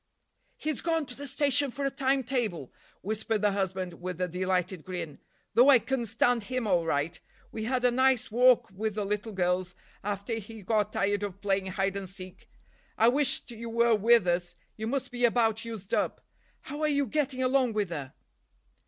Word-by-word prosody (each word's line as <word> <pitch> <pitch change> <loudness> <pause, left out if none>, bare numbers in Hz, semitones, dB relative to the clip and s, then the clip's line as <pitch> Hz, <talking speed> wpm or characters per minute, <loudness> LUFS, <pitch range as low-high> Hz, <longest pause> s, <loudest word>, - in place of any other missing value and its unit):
"He's 310 -3 -3
gone 325 -2 0
to 250 - -10
the 285 +1 -6
station 280 +1 +2
for 275 +3 -4
a 275 - 0
time 270 0 +1
table," 220 - -2 0.3
whispered 215 +1 -2
the 205 - +4
husband 190 -3 -3
with 180 -1 -5
a 180 - 0
delighted 185 -1 -1
grin: 175 -6 -6 0.3
"though 250 +4 +6
I 270 - +9
can 245 -1 -2
stand 230 +1 +1
him 255 0 -2
all 175 -5 +2
right. 155 +2 -1 0.3
We 220 -1 -4
had 250 +1 0
a 245 - +5
nice 260 -2 +2
walk 250 -1 +4
with 210 +2 -3
the 210 -2 -1
little 210 +2 -2
girls, 180 -1 0 0.3
after 200 +2 -3
he 220 0 -10
got 210 +1 +1
tired 205 0 0
of 200 -2 -5
playing 195 -1 0
hide 195 +1 -1
and 195 -2 -5
seek. 185 -1 -10 0.5
I 225 - +6
wished 270 -1 +1
you 230 0 -7
were 235 0 +3
with 225 0 +5
us. 175 0 0 0.2
You 220 0 -4
must 270 +2 -2
be 245 0 -4
about 225 -2 +2
used 215 -4 -7
up. - - 0 0.4
How 290 +3 -7
are 305 - +3
you 285 -1 +2
getting 265 0 -1
along 255 -2 +2
with 205 -4 -1
her?" 140 -5 -6
220 Hz, 190 wpm, -29 LUFS, 190-255 Hz, 0.5 s, I